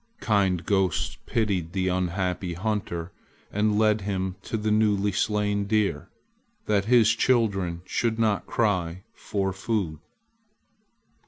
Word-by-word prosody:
Kind 100 -5 +1
ghosts 95 -2 0
pitied 95 -7 -1
the 95 -1 0
unhappy 90 0 -1
hunter 95 -3 -3 0.4
and 105 0 +1
led 110 -1 +3
him 95 -2 -2
to 110 - -3
the 110 0 -1
newly 105 -2 +2
slain 105 +1 0
deer, 100 -7 0 0.6
that 100 -2 +1
his 115 -1 +5
children 100 -8 +1
should 115 +2 -1
not 110 -3 +1
cry 95 -5 0
for 95 -2 -2
food. 95 -5 -2
100 Hz, 115 wpm, -26 LUFS, 95-110 Hz, 0.6 s, his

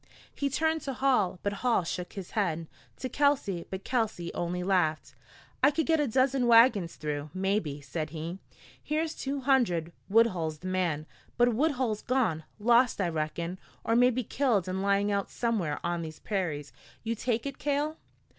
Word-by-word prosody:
He 280 - -1
turned 320 +3 +1
to 275 - -4
Hall, 250 -9 +2
but 200 - 0
Hall 240 -7 +2
shook 180 +1 -4
his 195 -4 -7
head; 170 -6 0 0.3
to - - -3
Kelsey, 260 -10 +1
but 190 0 -5
Kelsey 220 -9 -1
only 180 +1 -2
laughed. 160 -7 +1 0.5
"I 275 - +7
could 320 +2 0
get 325 -1 +3
a 295 - +2
dozen 255 +1 +2
wagons 230 -7 +5
through, 150 -1 -4
maybe," 185 -7 -1
said 155 +3 -4
he. 165 +4 -5 0.4
"Here's 315 +1 -1
two 275 -1 -3
hundred. 230 - +2 0.2
Woodhull's 185 -8 +3
the 185 - -8
man, 175 -5 0 0.3
but 240 0 +4
Woodhull's 255 -5 0
gone 220 -12 0
lost, 240 +3 +4
I 185 -3 +1
reckon, 165 +3 -3 0.2
or 225 - +1
maybe 250 +1 +4
killed 230 -6 +1
and 185 +1 -2
lying 200 +1 +2
out 200 -1 -1
somewhere 205 -11 -1
on 175 -1 -1
these 160 -1 -7
prairies. 160 -9 -3 0.3
You 230 0 -1
take 230 +1 -1
it, 275 -1 -5
Cale." 295 +3 0
205 Hz, 165 wpm, -29 LUFS, 170-255 Hz, 0.5 s, I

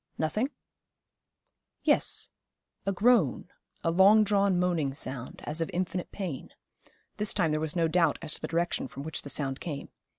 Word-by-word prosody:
Nothing? 210 - 0 1.3
Yes, - - +2 0.6
a - - +3
groan, 195 - +3 0.3
a 165 - +2
long 200 +5 +6
drawn 200 -2 +2
moaning 170 -6 0
sound, 130 -2 -6
as 155 +3 -1
of 165 - -1
infinite 180 0 -2
pain. 180 -10 -5 0.7
This 210 0 +1
time 165 -6 +2
there 155 - +1
was 155 +1 -2
no 165 -2 +2
doubt 165 -2 +2
as 150 - -2
to - - -2
the - - -3
direction 170 -3 -1
from 140 - -8
which 160 0 -2
the 140 - -8
sound 135 -2 -1
came. 150 -5 -5
170 Hz, 165 wpm, -29 LUFS, 150-190 Hz, 1.3 s, long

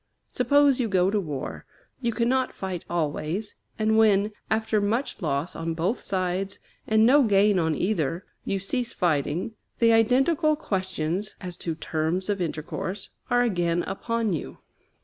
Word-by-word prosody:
Suppose 285 -2 +4
you 245 - +1
go 190 -2 +2
to 210 - +1
war, 150 -8 -5 0.4
you 235 -2 +1
cannot 245 +3 +1
fight 185 -3 -4
always; 170 +5 -2 0.2
and 220 0 +3
when, 210 -1 +4 0.2
after 220 -1 +1
much 220 +3 -1
loss 150 0 -1
on 165 0 -3
both 180 +9 0
sides 190 0 -2 0.3
and 220 0 +4
no 280 +5 +6
gain 205 -4 +4
on 160 -2 +1
either, 175 -3 -1 0.2
you 195 - -1
cease 235 +5 -2
fighting, 170 - 0 0.3
the 230 -1 +5
identical 270 +8 +3
questions 190 - -2
as 180 -2 -6
to 165 -3 -3
terms 160 +4 -2
of 200 -2 0
intercourse 175 +4 -4 0.2
are 245 0 +4
again 175 -6 +1
upon 225 +2 -1
you. 155 - -5
195 Hz, 150 wpm, -26 LUFS, 175-225 Hz, 0.4 s, no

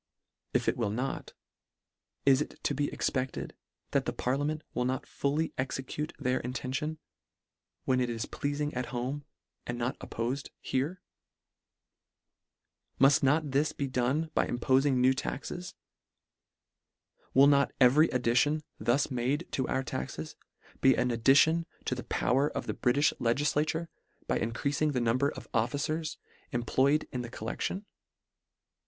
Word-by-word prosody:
If - - +2
it - - +2
will 115 -4 0
not, 125 +6 -3 0.9
is 135 0 +5
it - - -5
to - - +1
be 145 +1 -1
expected, 130 0 -2 0.4
that - - +1
the - - 0
parliament 145 +4 -1
will 125 - 0
not 130 +1 -1
fully 150 +3 -1
execute 135 +3 -3
their 130 -2 0
intention, 130 +5 -3 0.9
when 130 -1 +2
it 125 - 0
is 115 -1 -2
pleafing 145 +1 -2
at 125 0 -2
home, 130 +4 -3 0.4
and 120 - -3
not 120 +2 -2
oppofed 125 +5 -3
here? 150 +8 -2 1.9
Muff 135 +1 +6
not 145 +2 +2
this 145 +3 +2
be 140 - -2
done 135 +5 0
by - - +2
impoiing 130 +3 +2
new 130 +1 +5
taxes? 175 +6 -5 1.6
Will 135 +1 +8
not 140 -1 +4
every 140 +5 +6
ad 125 -1 0
dition, 145 +6 +3 0.2
thus 135 +4 +1
made 130 +6 0
to 130 - -1
our 130 - 0
taxes, 65 - -5 0.5
be 130 -1 +6
an 125 - +1
addition 140 +8 +4 0.2
to - - 0
the 125 - -5
power 135 +4 +2
of - - -4
the - - -2
Britifh 140 +3 +2
legislature, 145 +6 +1 0.4
by - - +1
increafing 140 +6 0
the 125 - +1
number 120 +4 +2
of - - -9
officers 145 +7 -1 0.3
employ 130 +4 +2
ed 150 - -2
in 125 - -2
the 120 - -6
collection 120 - -4
135 Hz, 140 wpm, -30 LUFS, 125-145 Hz, 1.9 s, Will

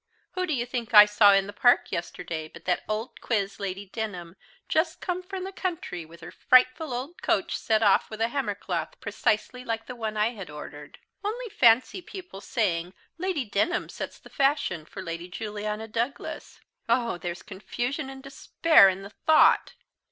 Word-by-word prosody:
Who 365 0 -2
do 315 - 0
you 240 -1 -1
think 240 -2 -3
I 210 0 +12
saw 210 0 +6
in 195 0 +4
the 205 - -8
Park 245 +4 +3
yesterday 165 -1 -4
but - - -15
that 180 -1 +1
old 215 +3 -4
quiz 200 -4 -1
Lady 195 0 -4
Denham, 185 -5 -6 0.3
just 320 +1 0
come 360 0 -3
from 375 0 -6
the 385 - -5
country, 335 - -4
with 170 +2 -15
her 160 - -9
frightful 255 +4 +3
old 260 +8 -5
coach - - 0
set 220 0 +1
off 200 -2 +4
with 220 - -8
a 225 +1 +1
hammer 240 -6 -2
cloth - - -4
precisely 235 +4 -1
like 225 -2 -3
the 250 - -7
one 220 -2 -4
I 210 +2 +3
had 200 -8 -8
ordered. 150 0 -10 0.3
Only 460 +4 -3
fancy 250 - +4
people 360 - -10
saying, 180 -7 -1 0.2
Lady 360 -7 -1
Denham 210 - 0
sets - - -6
the - - -17
fashion 270 - +1
for 190 +4 -8
Lady 170 0 -5
Juliana 210 +2 -5
Douglas!! 235 +5 -4 0.3
Oh, 235 -5 +1
there's 175 0 -5
confusion 245 +8 -4
and 265 0 -10
despair 275 -3 +5
in 190 +1 -4
the 200 - -10
thought!" 315 +8 +4
225 Hz, 180 wpm, -27 LUFS, 195-270 Hz, 0.3 s, I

